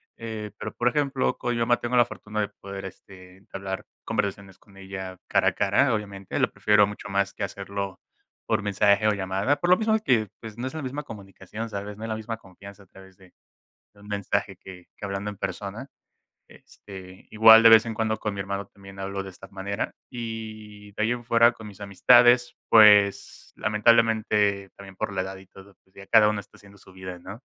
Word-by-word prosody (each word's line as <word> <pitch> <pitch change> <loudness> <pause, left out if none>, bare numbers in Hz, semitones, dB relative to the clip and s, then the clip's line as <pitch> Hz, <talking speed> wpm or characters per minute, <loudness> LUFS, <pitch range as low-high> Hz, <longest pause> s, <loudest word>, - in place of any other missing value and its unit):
Eh, 110 -2 -7
pero - - -6
por 120 - 0
ejemplo 140 0 0
con 120 - -1
mi - - -2
mamá, 120 +1 +2
tengo 120 +1 -1
la 120 - +6
fortuna 105 -2 -7
de 105 - 0
poder, 100 0 -9
este, 95 -1 -13
entablar 95 0 -7 0.2
conversaciones 100 -1 -3
con 100 -3 -22
ella 95 -1 -8
cara - - +3
a - - -9
cara 120 +7 +2
obviamente, 100 -3 -5
lo - - +1
prefiero 105 0 +4
mucho 105 0 -8
más 100 0 0
que - - -5
hacerlo 100 0 -5 0.5
por - - 0
mensaje 100 +1 +2
o 105 - +3
llamada, 100 +7 0
por 175 - -1
lo - - +8
mismo 220 0 +2
que, 115 - +1
pues 110 -1 -10
no 125 +2 -3
es 130 - -7
la 160 - -5
misma 135 +3 -4
comunicación 105 -2 -9
¿sabes?, 100 -1 -7
no 110 - -9
es 115 - -5
la 110 - -2
misma 110 +1 -5
confianza 100 0 -14
a - - -21
través 95 0 -17
de 95 -2 -20 0.6
de 100 - -20
un 100 - -15
mensaje 100 -1 -2
que 90 -1 -13
que - - -9
hablando 100 +1 -4
en 105 - -10
persona, 100 +6 -5 0.6
este, 95 -2 -14
igual 110 +1 +8
de 115 - +9
vez 110 0 +7
en 115 - -4
cuando 110 0 -1
con 105 -1 -3
mi 100 - -4
hermano 100 0 -4
también 95 -1 -14
hablo 95 0 -4
de 95 - -8
esta 95 +1 -13
manera. 100 +2 -5
Y 110 -3 -8
de 105 - -3
ahí 110 - +1
en 120 0 -7
fuera 115 0 +4
con 110 -2 -12
mis 105 -2 -12
amistades 120 +5 +4
pues 105 -2 +5
lamentablemente 105 -2 +2
también 95 -1 -13
por 100 - -3
la 95 - -1
edad 95 +1 -6
y 95 0 -16
todo, 95 +1 -17
pues 95 - -34
ya 100 - -12
cada 110 -2 +6
uno 105 -1 -1
está - - -21
haciendo 100 0 -18
su 95 - -18
vida 95 -1 -8
¿no? 100 +7 -10
100 Hz, 210 wpm, -25 LUFS, 95-110 Hz, 0.6 s, de